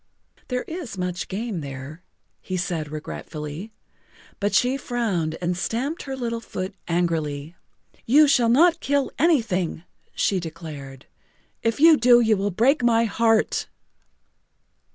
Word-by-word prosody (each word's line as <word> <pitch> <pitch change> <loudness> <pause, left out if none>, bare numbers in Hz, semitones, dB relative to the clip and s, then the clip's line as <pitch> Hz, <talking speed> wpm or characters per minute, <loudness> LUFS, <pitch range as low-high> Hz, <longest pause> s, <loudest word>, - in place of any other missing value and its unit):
"There 250 -1 -2
is 320 - -7
much 180 0 -3
game 205 -2 -4
there," 140 +3 -8 0.4
he 185 - -4
said 170 -4 -2
regretfully. 155 +4 -7 0.7
But 205 0 0
she 250 +2 +3
frowned 210 -12 -2
and 175 +1 0
stamped 255 - -2
her 270 -1 -5
little 235 -2 -2
foot 185 -4 -5
angrily. 165 -3 -1 0.5
"You 295 +6 +6
shall 245 -4 +4
not 330 +7 +5
kill 280 -1 0
anything," 220 - +1 0.3
she 195 - +1
declared. 150 -5 -8 0.6
"If 230 +1 0
you 320 0 +7
do 240 0 +6
you 225 -2 +3
will 200 +1 -1
break 245 - +2
my 230 -1 +4
heart." 225 0 +1
210 Hz, 130 wpm, -24 LUFS, 170-245 Hz, 0.7 s, you